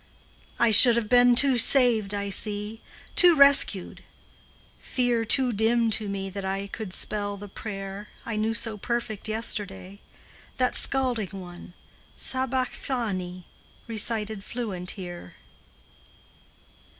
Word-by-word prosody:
I 235 Hz, -1 st, +3 dB
should 230 Hz, +2 st, +8 dB
have 235 Hz, -2 st, -1 dB
been 245 Hz, 0 st, +5 dB
too 260 Hz, -1 st, +4 dB
saved, 225 Hz, -6 st, +3 dB
I 200 Hz, 0 st, -3 dB
see, 210 Hz, +2 st, -1 dB, 0.3 s
Too 350 Hz, -2 st, +7 dB
rescued; 280 Hz, -, +4 dB, 0.8 s
fear 245 Hz, -2 st, -1 dB
too 255 Hz, +2 st, +1 dB
dim 225 Hz, +2 st, +1 dB
to 215 Hz, 0 st, -2 dB
me 195 Hz, -1 st, -4 dB
That 200 Hz, +1 st, -6 dB
I 195 Hz, +1 st, -3 dB
could 200 Hz, 0 st, -7 dB
spell 205 Hz, +1 st, -2 dB
the 205 Hz, +1 st, -9 dB
prayer 195 Hz, 0 st, -7 dB, 0.2 s
I 230 Hz, -, -4 dB
knew 220 Hz, +1 st, -1 dB
so 225 Hz, -2 st, -4 dB
perfect 235 Hz, -2 st, -3 dB
yesterday, 200 Hz, -3 st, -4 dB, 0.6 s
That 255 Hz, -1 st, +1 dB
scalding 240 Hz, -8 st, 0 dB
one, 175 Hz, -1 st, -12 dB, 0.4 s
"Sabachthani," 240 Hz, -8 st, -2 dB, 0.4 s
Recited 220 Hz, -2 st, 0 dB
fluent 200 Hz, -8 st, -5 dB
here. 175 Hz, -, -9 dB
215 Hz, 115 wpm, -25 LUFS, 195-240 Hz, 0.8 s, should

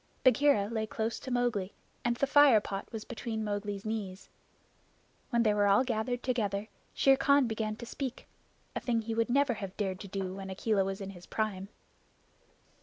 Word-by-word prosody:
Bagheera 260 Hz, -5 st, +4 dB
lay 220 Hz, -1 st, -2 dB
close 220 Hz, +1 st, -2 dB
to -, -, -7 dB
Mowgli, 240 Hz, -6 st, 0 dB, 0.3 s
and 240 Hz, 0 st, +1 dB
the 275 Hz, -, +1 dB
fire 280 Hz, -4 st, +7 dB
pot 195 Hz, -1 st, -5 dB
was 220 Hz, -2 st, -6 dB
between 225 Hz, -2 st, -4 dB
Mowgli's 205 Hz, -1 st, -3 dB
knees. 205 Hz, -4 st, -4 dB, 1.0 s
When 235 Hz, -2 st, +2 dB
they 215 Hz, -2 st, +3 dB
were 205 Hz, -1 st, +3 dB
all 200 Hz, +5 st, +5 dB
gathered 245 Hz, 0 st, -2 dB
together, 215 Hz, -4 st, -1 dB, 0.3 s
Shere 270 Hz, 0 st, +5 dB
Khan 280 Hz, 0 st, +4 dB
began 220 Hz, -2 st, -2 dB
to 235 Hz, -, -8 dB
speak 260 Hz, +1 st, -5 dB, 0.5 s
a -, -, 0 dB
thing 235 Hz, -2 st, 0 dB
he 225 Hz, +1 st, -3 dB
would 230 Hz, +1 st, +1 dB
never 275 Hz, 0 st, +3 dB
have 195 Hz, -4 st, -7 dB
dared 190 Hz, -3 st, -2 dB
to 200 Hz, -, -8 dB
do 190 Hz, -1 st, -3 dB
when 195 Hz, 0 st, -7 dB
Akela 195 Hz, +1 st, +1 dB
was 195 Hz, +1 st, -4 dB
in 195 Hz, 0 st, -5 dB
his 180 Hz, -2 st, -13 dB
prime. 200 Hz, -3 st, -2 dB
220 Hz, 180 wpm, -31 LUFS, 200-245 Hz, 1.0 s, fire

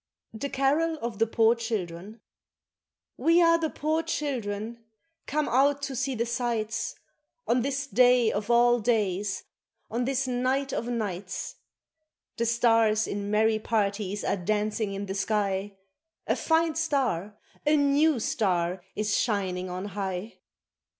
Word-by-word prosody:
THE 255 Hz, +6 st, -4 dB
CAROL 290 Hz, +4 st, +1 dB
OF 230 Hz, -4 st, -5 dB
THE 225 Hz, -, +3 dB
POOR 225 Hz, +1 st, +4 dB
CHILDREN 215 Hz, -3 st, -5 dB, 1.0 s
WE 335 Hz, +1 st, +4 dB
are 335 Hz, -1 st, +5 dB
the 320 Hz, -1 st, 0 dB
poor 310 Hz, +2 st, -1 dB
children, 235 Hz, -8 st, -3 dB, 0.4 s
come 300 Hz, +1 st, 0 dB
out 280 Hz, +3 st, +2 dB
to 275 Hz, -, -3 dB
see 265 Hz, +1 st, -1 dB
the 235 Hz, 0 st, 0 dB
sights 230 Hz, -2 st, -2 dB, 0.5 s
On 245 Hz, +1 st, +3 dB
this 275 Hz, +2 st, -2 dB
day 250 Hz, -3 st, +4 dB
of 205 Hz, +2 st, -3 dB
all 240 Hz, 0 st, +5 dB
days, 205 Hz, -4 st, 0 dB, 0.5 s
on 240 Hz, +2 st, -1 dB
this 270 Hz, 0 st, 0 dB
night 260 Hz, +2 st, 0 dB
of 235 Hz, -, -2 dB
nights, 200 Hz, -6 st, -4 dB, 0.8 s
The 235 Hz, -, 0 dB
stars 225 Hz, -2 st, +3 dB
in 200 Hz, 0 st, -4 dB
merry 215 Hz, +1 st, +2 dB
parties 205 Hz, -2 st, -1 dB
are -, -, 0 dB
dancing 210 Hz, +2 st, -1 dB
in 200 Hz, +1 st, -4 dB
the 190 Hz, -, -4 dB
sky, 200 Hz, -1 st, -1 dB, 0.5 s
A -, -, +1 dB
fine 320 Hz, 0 st, +2 dB
star, 265 Hz, -, -1 dB, 0.3 s
a 300 Hz, +1 st, +3 dB
new 285 Hz, 0 st, +3 dB
star, 180 Hz, -5 st, 0 dB
is 210 Hz, 0 st, 0 dB
shining 185 Hz, -5 st, -1 dB
on 180 Hz, +2 st, -4 dB
high 195 Hz, +1 st, -5 dB
230 Hz, 135 wpm, -27 LUFS, 205-270 Hz, 1.0 s, are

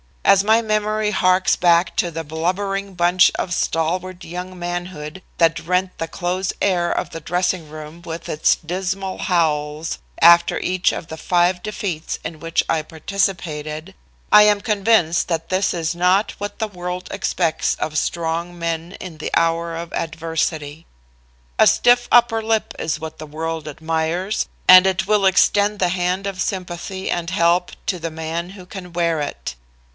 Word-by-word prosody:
"As 195 Hz, 0 st, +6 dB
my 220 Hz, +2 st, +4 dB
memory 215 Hz, 0 st, 0 dB
harks 185 Hz, -2 st, +3 dB
back 170 Hz, 0 st, +3 dB
to 175 Hz, -, +1 dB
the 165 Hz, 0 st, -5 dB
blubbering 190 Hz, +5 st, -2 dB
bunch 175 Hz, +1 st, +4 dB
of 175 Hz, -, -2 dB
stalwart 175 Hz, +3 st, -1 dB
young 180 Hz, +2 st, -7 dB
manhood 175 Hz, -2 st, -5 dB, 0.2 s
that 165 Hz, -1 st, +3 dB
rent 180 Hz, +3 st, -1 dB
the 165 Hz, -, -3 dB
close 180 Hz, +3 st, -2 dB
air 175 Hz, -3 st, +2 dB
of -, -, -2 dB
the 165 Hz, -, -7 dB
dressing 175 Hz, 0 st, -1 dB
room 155 Hz, +2 st, -10 dB
with 165 Hz, -1 st, -7 dB
its 155 Hz, -, +3 dB
dismal 190 Hz, +3 st, -4 dB
howls 155 Hz, -, 0 dB, 0.2 s
after 170 Hz, 0 st, +6 dB
each 185 Hz, 0 st, +1 dB
of -, -, -6 dB
the 160 Hz, -, -8 dB
five 175 Hz, +2 st, +1 dB
defeats 185 Hz, -6 st, -4 dB
in 160 Hz, -, -6 dB
which 165 Hz, +1 st, 0 dB
I 160 Hz, -, +2 dB
participated, 160 Hz, -1 st, -3 dB, 0.4 s
I 210 Hz, 0 st, +9 dB
am 210 Hz, -1 st, +4 dB
convinced 200 Hz, -6 st, +2 dB
that 165 Hz, -2 st, -2 dB
this 185 Hz, +2 st, +1 dB
is 165 Hz, -1 st, -1 dB
not 180 Hz, +4 st, +2 dB
what 205 Hz, 0 st, -5 dB
the 220 Hz, -, -1 dB
world 180 Hz, -2 st, -6 dB
expects 165 Hz, -3 st, 0 dB
of 155 Hz, 0 st, -3 dB
strong 170 Hz, +2 st, -2 dB
men 165 Hz, +1 st, -3 dB
in 175 Hz, -4 st, -8 dB
the 155 Hz, -, -5 dB
hour 165 Hz, 0 st, +1 dB
of 170 Hz, 0 st, -7 dB
adversity. 160 Hz, -1 st, -3 dB, 0.7 s
"A -, -, +7 dB
stiff 245 Hz, 0 st, +4 dB
upper 235 Hz, -2 st, +5 dB
lip 220 Hz, 0 st, 0 dB
is 160 Hz, -, -2 dB
what 160 Hz, 0 st, -8 dB
the 155 Hz, -, -7 dB
world 160 Hz, +1 st, -4 dB
admires, 160 Hz, +6 st, -2 dB, 0.2 s
and 185 Hz, +1 st, +9 dB
it 185 Hz, -2 st, 0 dB
will 210 Hz, 0 st, +2 dB
extend 205 Hz, +2 st, +3 dB
the 180 Hz, -2 st, +1 dB
hand 180 Hz, +2 st, -1 dB
of 195 Hz, -2 st, -3 dB
sympathy 185 Hz, 0 st, -4 dB
and 170 Hz, -1 st, -2 dB
help 175 Hz, -1 st, +2 dB
to 180 Hz, -, -1 dB
the 165 Hz, 0 st, -4 dB
man 160 Hz, +2 st, -4 dB
who 190 Hz, -2 st, -12 dB
can 180 Hz, -2 st, -9 dB
wear 170 Hz, -2 st, +1 dB
it. 145 Hz, -, -5 dB
175 Hz, 160 wpm, -20 LUFS, 165-190 Hz, 0.7 s, I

